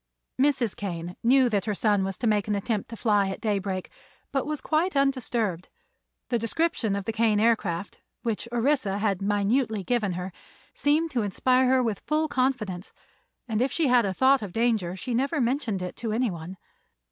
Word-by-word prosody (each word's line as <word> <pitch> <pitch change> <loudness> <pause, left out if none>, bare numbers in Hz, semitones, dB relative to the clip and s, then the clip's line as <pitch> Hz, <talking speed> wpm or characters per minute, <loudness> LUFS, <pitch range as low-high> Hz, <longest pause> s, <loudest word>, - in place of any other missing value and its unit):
Mrs. 265 -6 +2
Kane 175 -3 -5
knew 255 +2 +5
that 205 -5 0
her 210 -2 -1
son 205 -1 +2
was 195 -1 -3
to - - -4
make 210 -2 +2
an 210 - 0
attempt 205 +1 -2
to 230 - -8
fly 205 -4 +2
at 190 - -5
daybreak, 195 -4 -2 0.4
but 270 -1 -1
was 305 -1 -2
quite 320 +2 0
undisturbed. 240 -9 0 0.6
The 240 - +1
description 230 - 0
of 200 -1 -4
the 225 - -2
Kane 220 -2 +2
Aircraft, 205 -5 0 0.2
which 230 -1 -2
Orissa 240 -5 +1
had 200 -3 0
minutely 205 +2 +1
given 215 -3 0
her, 180 +1 -5 0.4
seemed 310 +3 +1
to 250 -4 0
inspire 255 +6 +2
her 260 -1 +4
with 220 -5 -1
full 310 +1 +1
confidence, 250 -10 -1 0.5
and 220 -1 -1
if 260 +1 +1
she 315 -2 +1
had 245 -4 +4
a - - 0
thought 265 +6 +4
of 200 -4 -6
danger 220 -6 +1
she 235 +6 -4
never 275 +6 0
mentioned 235 -6 0
it 180 - -5
to 225 -1 -3
anyone. 190 -6 -2
225 Hz, 180 wpm, -26 LUFS, 200-255 Hz, 0.6 s, knew